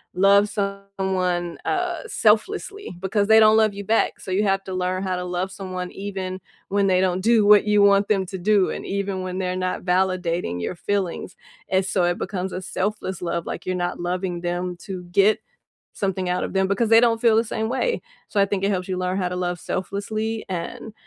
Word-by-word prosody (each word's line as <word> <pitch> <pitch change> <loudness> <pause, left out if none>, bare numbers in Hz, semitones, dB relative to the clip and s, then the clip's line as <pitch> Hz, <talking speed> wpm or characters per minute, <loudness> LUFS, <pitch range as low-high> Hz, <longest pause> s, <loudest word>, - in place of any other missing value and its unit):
love 200 +2 +5
someone, 190 -4 -2
uh, 360 -3 -1
selflessly, 390 - 0
because 200 +2 0
they 220 0 +7
don't 215 0 +6
love 215 -2 +3
you 200 0 -6
back, 225 +2 +1
so - - -10
you 190 +3 +1
have 195 -1 +1
to 190 - -8
learn 185 0 -1
how 190 -1 -1
to 180 - -3
love 180 +1 -3
someone 185 -2 -5
even 190 -2 -5 0.3
when 200 0 +1
they 185 -1 +3
don't 185 0 +1
do 225 +1 +4
what 210 0 +7
you 210 -1 +4
want 200 0 +5
them 200 -3 +2
to 190 +1 -6
do 195 +1 +3
and - - -5
even 195 -1 -2
when 185 0 -4
they're 185 -1 -1
not 185 0 -2
validating 180 - 0
your 85 - -3
feelings, 185 -1 -2 0.3
and 190 0 +2
so 195 -1 +1
it 175 0 +1
becomes 190 -1 -3
a 185 - -4
selfless 190 0 -3
love, 170 -1 -2
like - - -5
you're 185 - -1
not 175 -1 -2
loving 175 0 -2
them 175 +1 -2
to 185 -1 -7
get 195 +4 +3 0.5
something 190 -2 -2
out 180 0 0
of - - -3
them 190 0 +2
because 215 +4 +1
they 225 +1 +7
don't 230 -1 +2
feel 230 -2 +4
the 225 - +3
same 220 0 -2
way. 265 - 0 0.3
So, 205 - 0
I 200 - +4
think 195 -1 -2
it 200 - +2
helps 185 -2 -2
you 185 - -2
learn 185 +1 -1
how 180 -2 0
to 180 - -4
love 180 -1 -2
selflessly 215 +3 -3
and 185 +4 -5
190 Hz, 215 wpm, -23 LUFS, 180-205 Hz, 0.5 s, they